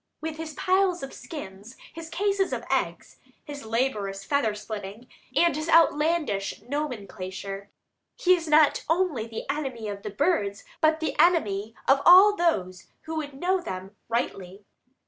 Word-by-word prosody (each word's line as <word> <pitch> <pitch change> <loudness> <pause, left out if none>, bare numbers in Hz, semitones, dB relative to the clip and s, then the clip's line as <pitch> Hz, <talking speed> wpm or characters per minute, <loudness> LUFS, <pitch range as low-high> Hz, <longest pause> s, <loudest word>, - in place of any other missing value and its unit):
With 315 0 -5
his 315 -2 -6
piles 370 -3 +1
of 270 - -7
skins, 215 - -9 0.2
his 325 0 -8
cases 395 +1 0
of - - -3
eggs, - - -2 0.3
his 285 -5 -8
laborious 210 -5 -1
feather 235 -6 +1
splitting, 210 +2 -7 0.3
and 340 -3 +4
his 310 +2 -3
outlandish 310 -10 +2
nomenclature, 200 -8 -5 0.5
he 365 0 +4
is 335 -2 -5
not 305 -1 +4
only 325 -10 +1
the 225 -1 -7
enemy 265 -6 -3
of 200 -1 -6
the 210 - -5
birds 205 - 0 0.2
but 315 0 +3
the 320 - -2
enemy 220 - +2
of 275 +1 +5
all 385 +4 +8
those 190 - -1
who 320 0 -6
would 290 -3 -5
know 370 +2 +1
them 190 - -7
rightly. 200 -4 -3
280 Hz, 145 wpm, -26 LUFS, 205-330 Hz, 0.5 s, all